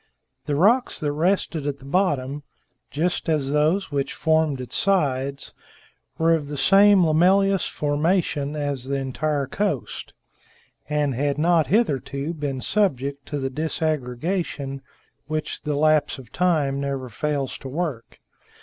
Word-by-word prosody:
The 145 - 0
rocks 225 - +3
that 150 -1 -1
rested 160 -1 0
at 140 -1 -2
the 135 - -15
bottom 145 -4 0 0.5
just 165 +6 -1
as 145 -4 +1
those 155 +6 +1
which 140 -1 -2
formed 160 -3 +1
its 125 - -4
sides 140 -8 0 0.6
were 165 +1 +3
of 155 -3 -1
the 145 0 -5
same 195 +6 +6
lamellous 190 +5 +3
formation 150 -1 0
as 145 -4 -3
the 140 +1 -2
entire 140 +2 -1
coast, 150 - -3 0.7
and 150 -2 +1
had 140 +3 -1
not 165 0 +3
hitherto 145 - 0
been 145 -4 -4
subject 140 -9 0
to 145 - -3
the 135 -1 -2
disaggregation 150 -1 -2 0.5
which 155 +1 -3
the 150 -1 -2
lapse 155 0 +2
of 125 -4 -13
time 155 -7 +1
never 140 -2 -3
fails 140 +2 -2
to - - -8
work. 140 -4 -4
150 Hz, 135 wpm, -23 LUFS, 140-165 Hz, 0.7 s, same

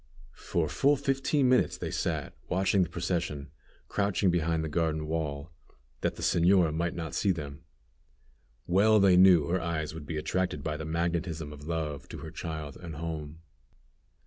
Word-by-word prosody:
For - - 0
full 145 +2 +3
fifteen 135 0 +1
minutes 125 0 +3
they - - -4
sat - - -2 0.2
watching 95 +1 +2
the 85 - +1
procession, 85 -5 -3 0.4
crouching 100 -2 +1
behind 80 -1 0
the - - -2
garden 80 -1 0
wall, 75 -1 -3 0.5
that - - -1
the - - -7
señora 85 -2 +4
might 85 +2 -1
not 80 -3 -5
see 100 - +1
them. 75 -3 -3 1.0
Well 105 +5 +4
they 95 -2 +6
knew 90 -4 +7
her 90 +4 0
eyes 80 -2 -2
would 80 -2 -8
be 80 - -3
attracted 75 -1 -1
by 75 -1 -2
the 80 - -5
magnetism 85 -1 -2
of 75 0 -11
love 75 -5 -3
to - - -7
her - - -8
child 80 -3 -6
and 85 -4 -8
home. 80 -1 -5
85 Hz, 165 wpm, -29 LUFS, 75-90 Hz, 1.0 s, knew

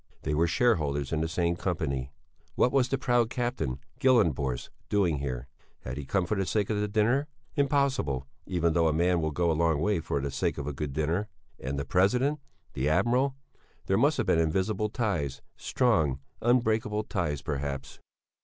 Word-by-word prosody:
They 75 - -1
were 80 +3 +3
shareholders 75 - +1
in 80 -1 0
the 80 - 0
same 85 +1 0
company! 70 -8 -2 0.4
What 125 - +3
was 130 -2 +2
the 135 - +1
proud 120 -3 +2
Captain 120 - -2 0.2
Gyllenborst 80 - +2 0.2
doing 90 -8 +2
here? 65 -2 -4 0.3
Had 65 +2 -6
he 70 - -5
come 90 +6 0
for 95 - -1
the 95 -2 0
sake 105 +3 0
of 105 - 0
the 105 - 0
dinner? 115 +7 +2 0.3
Impossible, 140 - +1 0.2
even 85 -3 +1
though 85 0 +3
a 80 - +2
man 85 +2 +2
will 80 - 0
go 85 +3 +1
a - - +2
long 80 -1 +2
way 100 +2 +1
for 80 -3 -2
the 70 0 -3
sake - - -1
of 70 - -4
a 75 - -3
good 70 0 -4
dinner. 80 +8 0 0.3
And 70 +3 -4
the 70 - -2
President? 125 - +2 0.3
The 70 +3 0
Admiral? 120 - +2 0.5
There - - +1
must - - +3
have - - 0
been - - +3
invisible 95 +6 0
ties, 95 - -2
strong, 80 - +1 0.2
unbreakable 110 -3 +2
ties 75 -8 -2
perhaps. 70 -2 -4
85 Hz, 180 wpm, -28 LUFS, 75-110 Hz, 0.5 s, were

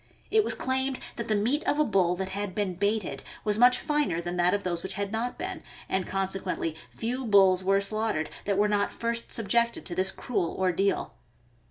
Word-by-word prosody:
It 435 -1 +5
was - - -1
claimed 260 0 -1 0.2
that 235 - -3
the 215 - +2
meat 240 +9 +1
of 290 - +2
a 305 - +4
bull 185 -5 +2
that 190 +1 -3
had 200 -1 -4
been 205 -3 -1
"baited 205 +2 -1
" - - -17
was 210 0 +1
much 250 +1 +6
finer 295 - 0
than 175 +1 -4
that 175 0 +3
of 205 - -3
those 175 -2 -2
which 190 - -6
had 200 0 -3
not 230 +3 -2
been, - - -5 0.3
and 190 -1 -1
consequently 190 -4 -2
few 250 +3 -3
bulls 195 -4 +5
were 195 +1 +3
slaughtered 210 -5 0
that 200 -1 0
were 210 +1 +4
not 205 -1 +1
first 235 0 -3
subjected 235 +2 +1
to 175 - -5
this 185 +2 +3
cruel 190 -4 -2
ordeal. 190 +1 0
200 Hz, 205 wpm, -28 LUFS, 190-235 Hz, 0.3 s, much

